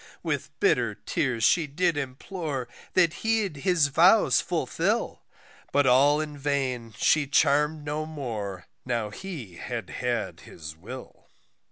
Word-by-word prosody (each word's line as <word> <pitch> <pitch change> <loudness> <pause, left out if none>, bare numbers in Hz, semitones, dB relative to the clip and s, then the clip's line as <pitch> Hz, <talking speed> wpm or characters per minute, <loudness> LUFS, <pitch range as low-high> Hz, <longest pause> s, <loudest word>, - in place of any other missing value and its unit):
With - - -3
bitter - - +2
tears 120 -4 -2
she 165 +3 +4
did 170 +3 +1
implore 140 0 -4 0.3
that 170 -3 +4
he'd 220 -8 0
his 165 -2 +2
vows - - +5
fulfil; - - -1 0.5
But 145 0 +3
all 140 +4 +5
in 150 -2 -5
vain 130 -6 -2
she 150 -2 +3
charm'd 150 +2 +2
no 150 +1 -3
more 110 - -5 0.2
now 115 -4 -2
he 135 - -8
had 115 -3 -5
had 120 -3 -2
his 80 -1 -10
will. 115 +11 -10
140 Hz, 130 wpm, -27 LUFS, 120-155 Hz, 0.5 s, vows